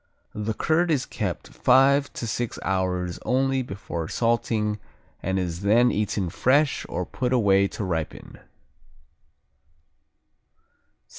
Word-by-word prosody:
The 105 Hz, +1 st, -3 dB
curd 170 Hz, +6 st, +1 dB
is 145 Hz, -5 st, +1 dB
kept -, -, -4 dB
five 140 Hz, +2 st, +4 dB
to -, -, -5 dB
six 115 Hz, +1 st, -3 dB
hours 90 Hz, -2 st, -1 dB
only 135 Hz, +1 st, +1 dB
before 95 Hz, -8 st, -5 dB
salting 110 Hz, -2 st, 0 dB, 0.4 s
and 95 Hz, +1 st, -1 dB
is 90 Hz, -2 st, -3 dB
then 115 Hz, +5 st, +4 dB
eaten 100 Hz, -4 st, -1 dB
fresh 140 Hz, -, +2 dB
or 90 Hz, +1 st, -2 dB
put 125 Hz, +5 st, -3 dB
away 100 Hz, -5 st, +4 dB
to 105 Hz, -, -6 dB
ripen. 85 Hz, -4 st, -4 dB
105 Hz, 115 wpm, -25 LUFS, 95-130 Hz, 0.4 s, five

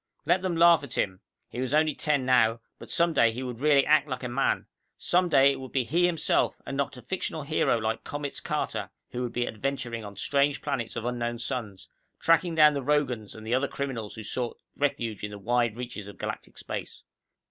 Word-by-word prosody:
Let 180 Hz, +2 st, +3 dB
them 185 Hz, -2 st, -1 dB
laugh 170 Hz, 0 st, +6 dB
at 135 Hz, -3 st, -6 dB
him. 95 Hz, -2 st, 0 dB, 0.3 s
He 125 Hz, -, -5 dB
was 130 Hz, +3 st, 0 dB
only 155 Hz, 0 st, +3 dB
ten 145 Hz, -2 st, 0 dB
now, 120 Hz, -3 st, +4 dB, 0.2 s
but -, -, -11 dB
some 170 Hz, 0 st, +2 dB
day 115 Hz, -6 st, +4 dB
he 125 Hz, +4 st, -5 dB
would 125 Hz, -2 st, -5 dB
really 145 Hz, -1 st, +4 dB
act 150 Hz, -1 st, +4 dB
like 130 Hz, -2 st, -4 dB
a -, -, -1 dB
man. 125 Hz, +3 st, 0 dB, 0.3 s
Some 180 Hz, 0 st, +2 dB
day 140 Hz, -2 st, +6 dB
it -, -, -4 dB
would 130 Hz, -1 st, -8 dB
be 130 Hz, -, +1 dB
he 170 Hz, +8 st, +2 dB
himself, 165 Hz, -3 st, +1 dB
and 135 Hz, -, -4 dB
not 140 Hz, -2 st, -2 dB
a 125 Hz, -, -11 dB
fictional 160 Hz, +1 st, -3 dB
hero 140 Hz, -4 st, +2 dB
like 110 Hz, 0 st, -2 dB
Comets 145 Hz, -1 st, -4 dB
Carter, -, -, -2 dB, 0.2 s
who 125 Hz, -, -3 dB
would 120 Hz, -2 st, -2 dB
be 120 Hz, 0 st, -1 dB
adventuring 120 Hz, -1 st, -3 dB
on 100 Hz, -1 st, -9 dB
strange 140 Hz, +7 st, +1 dB
planets 135 Hz, -6 st, -3 dB
of 115 Hz, -, -4 dB
unknown 120 Hz, -1 st, -2 dB
suns, 120 Hz, -5 st, -4 dB, 0.3 s
tracking 165 Hz, +1 st, +3 dB
down 150 Hz, -1 st, +7 dB
the 140 Hz, -, -2 dB
Rogans 130 Hz, -6 st, 0 dB
and 110 Hz, 0 st, -10 dB
the 115 Hz, -, -1 dB
other 130 Hz, +3 st, +2 dB
criminals 130 Hz, -8 st, -4 dB
who 110 Hz, -, -7 dB
sought 120 Hz, +2 st, -3 dB, 0.2 s
refuge 115 Hz, -7 st, -1 dB
in 105 Hz, -, -2 dB
the 105 Hz, -, -8 dB
wide 120 Hz, +2 st, 0 dB
reaches 120 Hz, -5 st, -6 dB
of 100 Hz, -, -11 dB
galactic -, -, -6 dB
space. -, -, -6 dB
130 Hz, 215 wpm, -27 LUFS, 115-145 Hz, 0.3 s, down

